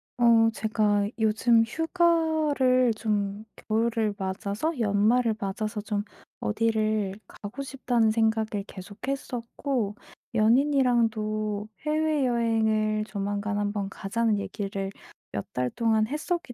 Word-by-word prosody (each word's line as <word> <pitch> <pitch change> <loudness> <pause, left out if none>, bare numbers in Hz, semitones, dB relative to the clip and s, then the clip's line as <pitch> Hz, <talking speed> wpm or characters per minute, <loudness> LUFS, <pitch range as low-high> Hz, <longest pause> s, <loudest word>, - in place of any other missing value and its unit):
어 230 -2 +5
제가 210 -2 +1
요즘 225 +1 +4
휴가를 315 -4 +2
좀 210 -2 -1
겨울을 220 -1 0
맞아서 200 - -2
연말을 220 +2 +3
맞아서 210 +2 -3
좀 205 -1 -2 0.4
'어디를 215 -2 0
가고 215 +7 -8
싶다.'는 250 -4 +1
생각을 220 -2 +1
계속 195 +1 -10
했었고 245 -4 -3 0.4
연인이랑도 225 -4 +2 0.2
"해외여행을 230 -8 +1
조만간 205 0 -2
1 205 0 0
번 200 -2 -3
가자."는 215 +2 0
얘기를 195 -1 -4 0.4
몇 100 - -3
달 125 0 0
동안 220 - +1
했었기 305 +1 -3
220 Hz, 235 characters per minute, -27 LUFS, 205-245 Hz, 0.4 s, 어